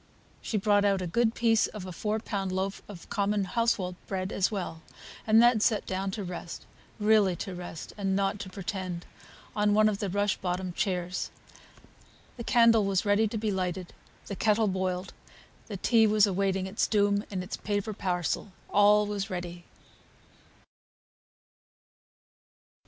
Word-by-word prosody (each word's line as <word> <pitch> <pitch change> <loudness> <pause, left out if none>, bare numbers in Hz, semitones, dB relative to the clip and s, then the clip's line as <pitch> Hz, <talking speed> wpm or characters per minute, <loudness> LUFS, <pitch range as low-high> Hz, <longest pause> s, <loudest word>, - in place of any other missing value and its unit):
She 220 - -2
brought 205 0 +3
out 200 -1 +2
a 185 - -3
good 225 +6 +1
piece 225 -1 +3
of 210 -3 -8
a 185 - -6
four 210 +5 -2
pound 200 -4 -3
loaf 190 +1 -2
of 185 -5 -10
common 205 0 +1
household 195 -2 0
bread 190 0 -3
as 195 - +1
well, 180 -6 -4 0.5
and 220 +1 +6
then 240 -2 +5
sat 215 0 +2
down 190 +1 -2
to 205 - -3
rest, 175 -2 -7 0.3
really 210 -3 +4
to 190 +3 -5
rest, 175 -2 -8
and 195 -1 0
not 195 +1 0
to 200 - -6
pretend, 185 -2 -5 0.5
on 210 -1 +2
one 215 0 +5
of 205 -2 -1
the 200 - -2
rush 205 +2 0
bottomed 180 -1 -3
chairs. 180 -3 -2 1.1
The 235 - -5
candle 230 -2 +5
was 195 -1 0
ready 205 +2 +3
to 220 - -4
be 215 0 -1
lighted, 185 -1 -3 0.3
the 200 - -5
kettle 215 +2 +2
boiled, 185 -1 -2 0.5
the 205 - -5
tea 225 +3 +4
was 210 0 +5
awaiting 195 -1 0
its 190 +3 0
doom 205 -1 +2
in 185 -2 -3
its 180 - -5
paper 205 +1 -2
parcel; 180 0 -2 0.2
all 210 +1 +5
was 205 -1 -3
ready. 175 -1 -6
200 Hz, 155 wpm, -28 LUFS, 185-210 Hz, 1.1 s, and